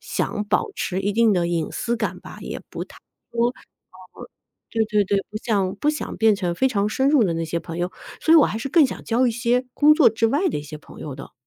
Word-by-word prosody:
想 210 - -2
保 325 - +1
持 185 - -2
一 200 +1 -1
定 230 0 +4
的 175 -3 +1
隐 165 -3 -1
私 235 0 -2
感 235 - -3
吧， - - -11
也 - - -6
不 - - -5
太 - - -17 0.4
说 235 0 +2
嗯， - - -12 1.2
对 225 -1 +1
对 210 -1 +2
对， 200 +1 +1
不 215 - -5
想 200 -4 -1
不 295 - +1
想 305 - -4
变 220 -2 +4
成 180 -3 -2
非 265 - +2
常 205 -4 0
深 265 +5 +1
入 285 -6 +4
的 175 - 0
那 165 0 -2
些 170 +1 -2
朋 165 -1 -8
友， 175 +1 -2 0.3
所 320 - +4
以 - - +9
我 300 - +6
还 215 - -3
是 235 +5 -4
更 310 0 +5
想 - - -6
交 240 +3 +1
一 235 - +1
些 245 +2 0
工 300 +1 +6
作 305 -7 +6
之 225 +1 +1
外 290 +11 +1
的 - - -2
一 145 - -4
些 150 +1 -9
朋 - - -15
友 150 - -6
的。 135 - -11
220 Hz, 275 characters per minute, -22 LUFS, 185-250 Hz, 1.2 s, 以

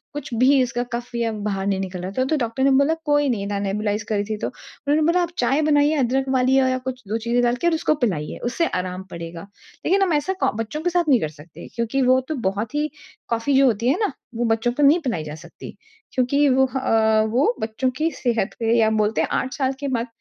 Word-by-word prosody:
कुछ 280 -4 -6
भी 260 +4 +4
इसका 245 -1 -1
कफ़ 240 +1 -5
या 230 -1 0
बाहर 195 -2 -2
नहीं 195 -1 0
निकल 185 -2 -5
रहा 185 +1 -5
था, 255 - +3
तो 310 - +1
डॉक्टर 235 +1 -1
ने 275 - +4
बोला 280 +4 +4
कोई 290 -1 +3
नहीं 200 -5 -1
ना 205 0 -2
नेबुलाइज़ 205 +2 -1
करी 205 -2 +1
थी 215 0 -3
तो - - -2
उन्होंने 295 +2 -3
बोला 360 +1 +2
आप 345 - -1
चाय 270 +5 +2
बनाइए, 295 0 +3
अदरक 265 -1 +1
वाली 255 +1 +3
या 260 -1 +2
कुछ 255 0 -6
2 215 +3 -1
चीजें 240 +1 +1
डाल 240 0 +2
के 345 - +2
और 340 - +3
उसको 310 -1 +1
पिलाइए, 155 -9 -3
उससे 295 +8 0
आराम 180 0 -3
पड़ेगा, 165 0 -7 0.4
लेकिन 390 +3 +3
हम 375 -4 +2
ऐसा 295 +5 0
को - - +3
बच्चों 225 +7 -4
के 355 - +1
साथ 350 0 +2
नहीं 260 -4 +5
लड़ 155 - -1
सकते 155 +2 -13
क्योंकि 235 +3 -1
वो 255 0 +4
तो 310 - -1
बहुत 210 +5 -4
ही 300 +1 0 0.4
कॉफ़ी 230 +4 0
जो 275 - +6
होती 230 -1 +1
है 285 - +2
ना, - - -2 0.2
वो 240 +1 0
बच्चों 225 +1 +1
को 290 - 0
नहीं 295 +5 +6
पिलाई 240 - -2
जा 150 0 -7
सकती, 170 +2 -11 0.4
क्योंकि 280 +3 +2
वो 265 0 +4
ह - - +1
अ, 220 -3 +3
वो 280 - +2
बच्चों 220 +4 -1
की 315 +1 +1
सेहत 235 -7 -1
पे 225 0 +1
या 220 -1 +4
बोलते 215 0 +1
हैं - - 0
8 260 - -1
साल 265 -2 0
के 285 - -3
बाद 245 -3 -1
245 Hz, 245 wpm, -22 LUFS, 215-280 Hz, 0.4 s, जो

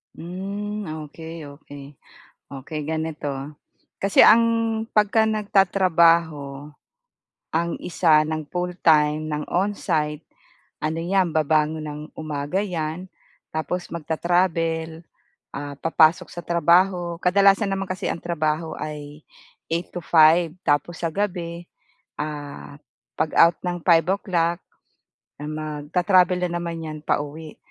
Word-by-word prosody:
Mm, 200 +4 -5 0.2
okey, 160 -1 -9
okey. 145 -2 -12 0.5
Okey, 140 +3 -6
ganito. 160 -2 -3 0.7
Kasi 195 0 +5
ang 230 +1 +7 0.4
pagka 220 +1 +3
nagtatrabaho 170 -8 +2 0.8
ang 170 +1 0
isa 155 -3 +3
ng 155 0 -3
full-time 155 -4 +1
ng 150 0 -3
onsite, 165 -6 -1 0.6
ano 155 +1 -1
'yan 180 +1 +1
babangon 155 0 +1
ng 150 0 -6 0.2
umaga 150 +2 -3
'yan. 170 -1 -4 0.5
Tapos 175 +3 -3
magta-travel, 165 0 -1 0.5
ah, 145 0 -5
papasok 165 +2 +3
sa 175 - -6
trabaho. 175 +1 +2
Kadalasan 195 +2 +4
naman 195 0 -2
kasi 185 - -2
ang - - -3
trabaho 160 -1 -1
ay 150 0 -7 0.5
8-5 165 -1 +3 0.2
tapos 145 +3 +1
sa 165 - 0
gabi, 175 -4 -3 0.6
ah, 145 -1 -6 0.4
pag-out 160 +1 +4
ng 175 -1 -2
5 165 -2 +5
o'clock 175 -3 0 0.8
magta-travel 155 +5 +1
na 175 - -2
naman 170 -1 -5
'yan 155 -1 -6
pauwi. 150 +2 -3
165 Hz, 100 wpm, -23 LUFS, 155-180 Hz, 0.8 s, ang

